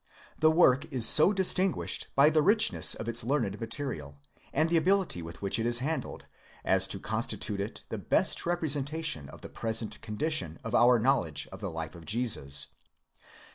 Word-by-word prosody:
The 155 Hz, -, +4 dB
work 155 Hz, -5 st, +3 dB
is 125 Hz, -4 st, +2 dB
so 155 Hz, +6 st, +7 dB
distinguished 190 Hz, -1 st, 0 dB
by 140 Hz, +3 st, +5 dB
the 155 Hz, 0 st, +3 dB
richness 210 Hz, +7 st, +4 dB
of 110 Hz, -, -7 dB
its 115 Hz, 0 st, -1 dB
learned 115 Hz, -6 st, -2 dB
material, 115 Hz, -, -6 dB, 0.3 s
and 155 Hz, +3 st, +1 dB
the 170 Hz, -, 0 dB
ability 185 Hz, -, 0 dB
with 85 Hz, +4 st, -10 dB
which 100 Hz, +3 st, -1 dB
it 115 Hz, -, -1 dB
is 120 Hz, 0 st, +1 dB
handled, 150 Hz, +6 st, -4 dB, 0.4 s
as -, -, +2 dB
to -, -, -3 dB
con -, -, -3 dB
stitute 105 Hz, -2 st, -3 dB
it 100 Hz, +2 st, -5 dB
the -, -, -5 dB
best -, -, +1 dB
representation 155 Hz, -, -2 dB
of -, -, -13 dB
the -, -, -10 dB
present 110 Hz, -1 st, -4 dB
condition 105 Hz, -, -3 dB
of 115 Hz, -, -6 dB
our 120 Hz, +1 st, +5 dB
knowledge 115 Hz, -, 0 dB
of -, -, -11 dB
the -, -, -4 dB
life 80 Hz, 0 st, -6 dB
of 85 Hz, -2 st, -13 dB
Jesus. 90 Hz, -, -1 dB
125 Hz, 175 wpm, -29 LUFS, 100-155 Hz, 0.4 s, so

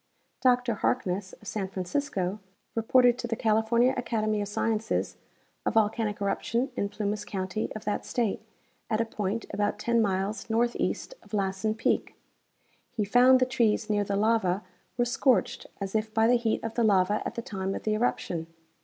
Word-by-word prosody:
Dr 250 Hz, -2 st, +3 dB
Harkness, 195 Hz, -4 st, -1 dB
of 210 Hz, -, -14 dB
San 200 Hz, -2 st, -2 dB
Francisco, 190 Hz, 0 st, -2 dB, 0.3 s
reported 245 Hz, +2 st, +4 dB
to 240 Hz, -, -3 dB
the 230 Hz, -, -1 dB
California 225 Hz, +3 st, +3 dB
Academy 215 Hz, -3 st, 0 dB
of 205 Hz, -, -3 dB
Sciences 220 Hz, +2 st, -1 dB, 0.5 s
a -, -, +1 dB
volcanic 215 Hz, -1 st, +1 dB
eruption 235 Hz, +6 st, -1 dB
in 200 Hz, -, -1 dB
Plumas 210 Hz, 0 st, -2 dB
county 195 Hz, +1 st, -3 dB
of 215 Hz, -, -7 dB
that 210 Hz, -, -1 dB
state, 230 Hz, -5 st, -1 dB, 0.5 s
at 215 Hz, -2 st, +1 dB
a 230 Hz, -, +2 dB
point 215 Hz, 0 st, -3 dB
about 205 Hz, 0 st, 0 dB
ten 235 Hz, -1 st, +2 dB
miles 200 Hz, +2 st, -1 dB
northeast 235 Hz, -, 0 dB
of 210 Hz, -, -7 dB
Lassen 195 Hz, +2 st, 0 dB
peak. 225 Hz, -, 0 dB, 0.7 s
He 220 Hz, -4 st, -2 dB
found 250 Hz, +5 st, +6 dB
the 255 Hz, -, +4 dB
trees 230 Hz, -3 st, +1 dB
near 205 Hz, -1 st, +2 dB
the 200 Hz, 0 st, -2 dB
lava 205 Hz, -3 st, +2 dB, 0.3 s
were 240 Hz, -, +3 dB
scorched 250 Hz, +1 st, +1 dB
as 195 Hz, -1 st, -4 dB
if 220 Hz, 0 st, 0 dB
by 220 Hz, 0 st, +3 dB
the 240 Hz, -, +5 dB
heat 235 Hz, -2 st, +1 dB
of 225 Hz, 0 st, -3 dB
the 235 Hz, -, +1 dB
lava 205 Hz, 0 st, +3 dB
at -, -, -5 dB
the 235 Hz, -, -4 dB
time 195 Hz, -2 st, -3 dB
of -, -, -6 dB
the 215 Hz, -, +1 dB
eruption. 180 Hz, -7 st, -1 dB
215 Hz, 170 wpm, -28 LUFS, 200-235 Hz, 0.7 s, found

